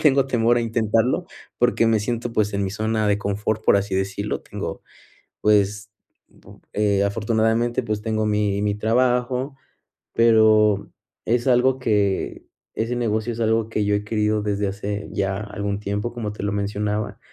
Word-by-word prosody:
Le -, -, -7 dB
tengo 140 Hz, -3 st, +4 dB
temor 120 Hz, -2 st, +2 dB
a -, -, 0 dB
intentarlo 115 Hz, -, +1 dB, 0.3 s
porque 120 Hz, -1 st, +3 dB
me 110 Hz, -1 st, +3 dB
siento, 120 Hz, +2 st, -3 dB
pues, 105 Hz, -2 st, +1 dB
en 100 Hz, 0 st, 0 dB
mi 95 Hz, -, -2 dB
zona 110 Hz, +1 st, -1 dB
de 100 Hz, 0 st, +2 dB
confort, 105 Hz, +1 st, -2 dB
por -, -, +5 dB
así 100 Hz, -1 st, -1 dB
decirlo. 95 Hz, +2 st, -2 dB
Tengo, -, -, -6 dB, 0.6 s
pues, 105 Hz, 0 st, +2 dB, 0.8 s
eh, 100 Hz, -1 st, +2 dB
afortunadamente, 110 Hz, +3 st, +1 dB
pues 105 Hz, -2 st, -3 dB
tengo 110 Hz, -1 st, -1 dB
mi 105 Hz, -1 st, 0 dB
mi 105 Hz, -1 st, +1 dB
trabajo, 125 Hz, +4 st, 0 dB, 0.6 s
pero 110 Hz, -3 st, +4 dB, 0.3 s
es 120 Hz, +2 st, +1 dB
algo 130 Hz, +1 st, +4 dB
que 105 Hz, -5 st, 0 dB, 0.3 s
ese 115 Hz, +2 st, -1 dB
negocio 115 Hz, 0 st, -1 dB
es 115 Hz, -, -8 dB
algo 110 Hz, 0 st, +1 dB
que 105 Hz, -2 st, -1 dB
yo 105 Hz, -, +1 dB
he 105 Hz, -, -2 dB
querido 105 Hz, -1 st, 0 dB
desde 100 Hz, -1 st, -1 dB
hace 100 Hz, +1 st, -4 dB
ya 95 Hz, 0 st, -1 dB
algún 100 Hz, -1 st, -4 dB
tiempo, 105 Hz, +3 st, -3 dB
como 110 Hz, -3 st, -4 dB
te 105 Hz, -, -7 dB
lo 100 Hz, -, -1 dB
mencionaba, 105 Hz, +1 st, -2 dB
105 Hz, 165 wpm, -22 LUFS, 105-115 Hz, 0.8 s, por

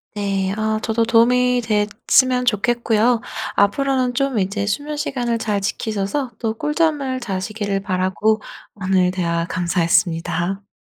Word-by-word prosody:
네. 195 Hz, -2 st, -1 dB
아 215 Hz, 0 st, 0 dB
저도 230 Hz, 0 st, 0 dB
도움이 245 Hz, +2 st, +3 dB
됐으면 230 Hz, +4 st, +2 dB
좋겠고요. 235 Hz, +1 st, +2 dB, 0.3 s
앞으로는 255 Hz, +4 st, +1 dB
좀 275 Hz, -3 st, 0 dB
이제 200 Hz, +1 st, -1 dB
수면 290 Hz, +9 st, -3 dB
시간을 240 Hz, -5 st, -1 dB
잘 210 Hz, -3 st, -1 dB
지키셔서 215 Hz, +5 st, -2 dB
또 225 Hz, -1 st, -2 dB
꿀잠을 300 Hz, -3 st, 0 dB
자시기를 200 Hz, -1 st, -3 dB
바라고 190 Hz, +3 st, 0 dB, 0.3 s
오늘 185 Hz, -2 st, +1 dB
대화 170 Hz, -2 st, -1 dB
감사했습니다. 175 Hz, +1 st, 0 dB
215 Hz, 290 characters per minute, -20 LUFS, 195-245 Hz, 0.3 s, 도움이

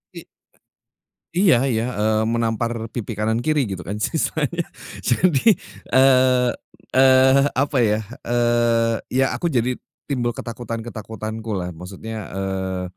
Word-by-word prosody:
I -, -, -8 dB, 1.1 s
iya 170 Hz, -9 st, +4 dB
iya, 115 Hz, -3 st, 0 dB
eee, 110 Hz, +1 st, +1 dB
menampar 115 Hz, 0 st, -1 dB
pipi 115 Hz, -1 st, -5 dB
kanan 110 Hz, +1 st, +1 dB
kiri, 150 Hz, -4 st, +2 dB
gitu 95 Hz, -2 st, -5 dB
kan 100 Hz, +4 st, -4 dB
istilahnya. 160 Hz, +6 st, -1 dB, 0.4 s
Jadi, 165 Hz, -, +3 dB, 0.4 s
eee 130 Hz, -1 st, +5 dB, 0.4 s
eee, 130 Hz, +1 st, +6 dB
apa 140 Hz, 0 st, +1 dB
ya, 105 Hz, -1 st, +2 dB, 0.3 s
eee, 120 Hz, -1 st, +2 dB
ya 135 Hz, +1 st, +2 dB
aku 175 Hz, -, -2 dB
jadi 125 Hz, -2 st, +1 dB, 0.4 s
timbul 120 Hz, -3 st, 0 dB
ketakutan-ketakutanku 115 Hz, -1 st, -6 dB
lah. 90 Hz, 0 st, -4 dB
Maksudnya, 95 Hz, +6 st, -8 dB, 0.2 s
eee, 95 Hz, -1 st, -3 dB
120 Hz, 115 wpm, -21 LUFS, 110-130 Hz, 1.1 s, eee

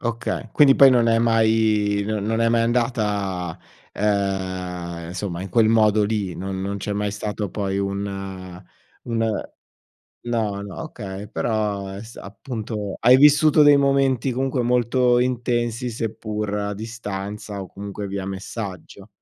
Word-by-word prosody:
Okay, 115 Hz, -1 st, -3 dB
quindi 140 Hz, -2 st, +6 dB
poi 135 Hz, -1 st, +8 dB
non 120 Hz, -2 st, +4 dB
è 115 Hz, 0 st, +3 dB
mai 110 Hz, -3 st, +2 dB
non 110 Hz, -2 st, -2 dB
non 115 Hz, +1 st, 0 dB
è 115 Hz, -, +3 dB
mai 115 Hz, 0 st, +3 dB
andata, 105 Hz, -8 st, -1 dB, 0.3 s
ehm, 95 Hz, -4 st, -2 dB
insomma 90 Hz, -1 st, -4 dB
in 95 Hz, -, -6 dB
quel 110 Hz, +3 st, +3 dB
modo 110 Hz, -2 st, +4 dB
lì. 100 Hz, -4 st, -2 dB
Non 95 Hz, +1 st, -4 dB
non 100 Hz, +1 st, -3 dB
c'è 105 Hz, +1 st, -3 dB
mai 105 Hz, 0 st, -1 dB
stato 105 Hz, -1 st, -4 dB
poi 100 Hz, 0 st, -2 dB
un, 100 Hz, +1 st, -2 dB
ehm 95 Hz, -2 st, -7 dB, 0.4 s
un 115 Hz, -2 st, 0 dB, 0.8 s
no, 110 Hz, -4 st, -1 dB
no, 100 Hz, +9 st, -8 dB
okay 100 Hz, -9 st, -7 dB
però 105 Hz, -3 st, -1 dB
è 95 Hz, +1 st, -7 dB
s 115 Hz, +1 st, -12 dB
appunto 105 Hz, -1 st, -6 dB
hai 125 Hz, +2 st, +7 dB
vissuto 150 Hz, +2 st, +6 dB
dei 145 Hz, -1 st, +7 dB
momenti 135 Hz, -2 st, +2 dB
comunque 130 Hz, 0 st, -1 dB
molto 125 Hz, +1 st, +2 dB
intensi. 120 Hz, -1 st, -1 dB
seppur 110 Hz, -2 st, -4 dB
a 105 Hz, 0 st, -2 dB
distanza 105 Hz, -2 st, -6 dB
o 95 Hz, -, -6 dB
comunque 100 Hz, 0 st, -6 dB
via 100 Hz, -1 st, -4 dB
messaggio. 95 Hz, 0 st, -7 dB
105 Hz, 145 wpm, -22 LUFS, 100-115 Hz, 0.8 s, poi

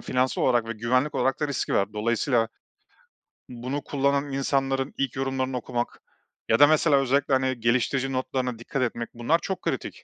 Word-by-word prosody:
finansal 130 Hz, 0 st, 0 dB
olarak 120 Hz, -3 st, +3 dB
ve -, -, -1 dB
güvenlik 125 Hz, +6 st, 0 dB
olarak 135 Hz, -, 0 dB
da 150 Hz, -, 0 dB
riski 140 Hz, -, -2 dB
var. 100 Hz, +1 st, +1 dB
Dolayısıyla 115 Hz, +2 st, +1 dB, 1.0 s
bunu 125 Hz, +4 st, -4 dB
kullanan 140 Hz, 0 st, 0 dB
insanların 135 Hz, 0 st, 0 dB
ilk 135 Hz, -3 st, -1 dB
yorumlarını 130 Hz, -1 st, -1 dB
okumak 120 Hz, 0 st, -4 dB, 0.5 s
ya -, -, +4 dB
da 145 Hz, -, +9 dB
mesela 155 Hz, -1 st, +4 dB
özellikle, 135 Hz, +1 st, +1 dB
hani, 130 Hz, -2 st, +1 dB
geliştirici 130 Hz, +3 st, +1 dB
notlarına 130 Hz, -2 st, -2 dB
dikkat 130 Hz, +3 st, -3 dB
etmek; 115 Hz, -1 st, -2 dB
bunlar 120 Hz, +8 st, +1 dB
çok 190 Hz, +1 st, -4 dB
kritik. -, -, -4 dB
130 Hz, 160 wpm, -26 LUFS, 120-140 Hz, 1.0 s, da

